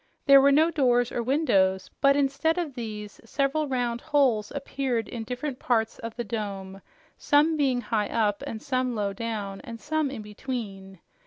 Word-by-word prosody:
There 275 -1 +8
were 280 +1 +5
no 315 +4 +4
doors 245 -6 +2
or 240 - -1
windows, 195 -9 +1
but 275 0 +5
instead 280 +4 +1
of 335 -6 -2
these, 215 -4 -7
several 280 +5 0
round 245 -3 -1
holes 250 -8 +2
appeared 265 -5 -2
in 230 -2 -5
different 250 +3 -4
parts 225 -3 0
of 230 -1 -6
the 240 - -3
dome, 195 -3 -5 0.4
some 300 +3 +3
being 265 -5 +1
high 215 -2 -1
up 210 -3 0
and 220 - -6
some 255 -3 -1
low 200 -2 -1
down 205 -2 -4
and 230 -4 -8
some 310 +1 -1
in 245 -5 -6
between. 205 -4 -6
245 Hz, 170 wpm, -26 LUFS, 215-275 Hz, 0.4 s, There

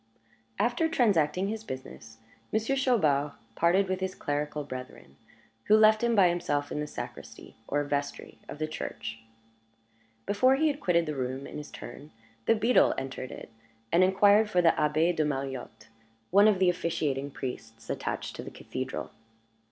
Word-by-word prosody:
After 245 +8 +1
transacting 195 - +2
his 220 +1 -4
business, 120 - -9 0.3
Monsieur 220 +5 +1
Chaubard 155 - +2 0.2
parted 185 +4 +3
with 185 0 -1
his 190 0 -3
clerical 150 +1 -2
brethren, 130 - -9 0.5
who 215 - +6
left 215 +1 +5
him 235 -1 +2
by 195 -3 +6
himself 170 -5 -1
in - - -2
the 150 - -3
sacristy - - -9
(or 145 +1 0
vestry) 145 0 -4
of - - -7
the 155 - -1
church. 110 -7 -6 1.1
Before 255 +6 +4
he 310 +3 +2
had 285 0 -3
quitted 170 -3 +2
the 155 - -3
room, 130 0 -3
in - - -7
his 150 - -9
turn, 145 - -10 0.4
the - - +5
beadle 230 +3 +4
entered 130 -1 -5
it, - - -10 0.4
and 175 +2 +5
inquired 205 +3 +5
for 180 - +2
the 165 - +6
Abbé 155 +3 +1
de 155 - +2
Mariotte, 135 -6 -4 0.4
one 200 +3 +7
of 210 -3 +4
the 185 -1 +4
officiating 145 -5 -2
priests 115 -5 -7
attached - - -4
to - - -6
the - - -7
cathedral. - - -6
165 Hz, 160 wpm, -28 LUFS, 140-205 Hz, 1.1 s, one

